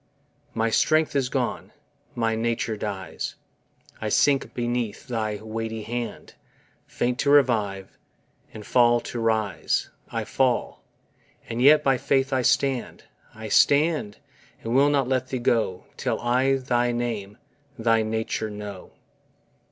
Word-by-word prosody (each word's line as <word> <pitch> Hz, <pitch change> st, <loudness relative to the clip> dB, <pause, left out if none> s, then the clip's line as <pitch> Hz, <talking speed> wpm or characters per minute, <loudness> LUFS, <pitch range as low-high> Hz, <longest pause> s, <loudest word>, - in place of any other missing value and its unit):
My 115 Hz, 0 st, +1 dB
strength 155 Hz, +5 st, +2 dB
is 135 Hz, -3 st, +1 dB
gone, -, -, -3 dB, 0.4 s
my 115 Hz, -1 st, 0 dB
nature 115 Hz, -1 st, -1 dB
dies, 100 Hz, -3 st, -5 dB, 0.7 s
I -, -, -2 dB
sink 140 Hz, -2 st, +2 dB
beneath 120 Hz, 0 st, -2 dB
thy 110 Hz, -4 st, -2 dB
weighty 110 Hz, +1 st, -5 dB
hand, 120 Hz, +1 st, -5 dB, 0.5 s
Faint 125 Hz, +1 st, -2 dB
to 140 Hz, -, +1 dB
revive, 110 Hz, -9 st, +2 dB, 0.5 s
and 105 Hz, -1 st, -10 dB
fall 120 Hz, +1 st, +4 dB
to 120 Hz, -, -6 dB
rise; 110 Hz, -7 st, 0 dB, 0.2 s
I -, -, -2 dB
fall, 130 Hz, -2 st, 0 dB, 0.6 s
and 115 Hz, +1 st, -3 dB
yet 150 Hz, +3 st, +6 dB
by 135 Hz, -3 st, +2 dB
faith 135 Hz, 0 st, +1 dB
I 130 Hz, -, +2 dB
stand, 130 Hz, 0 st, 0 dB, 0.3 s
I 110 Hz, 0 st, -7 dB
stand, 145 Hz, -2 st, +3 dB, 0.5 s
and 115 Hz, -, -3 dB
will 140 Hz, +3 st, +5 dB
not 140 Hz, -3 st, +1 dB
let 130 Hz, -1 st, 0 dB
Thee 130 Hz, -, -3 dB
go, 115 Hz, -6 st, 0 dB
Till -, -, -1 dB
I 130 Hz, +3 st, +2 dB
thy 120 Hz, -2 st, 0 dB
name, 115 Hz, -4 st, -3 dB, 0.4 s
thy 115 Hz, -1 st, +2 dB
nature 110 Hz, 0 st, -2 dB
know. 105 Hz, -2 st, -8 dB
120 Hz, 130 wpm, -25 LUFS, 110-130 Hz, 0.7 s, yet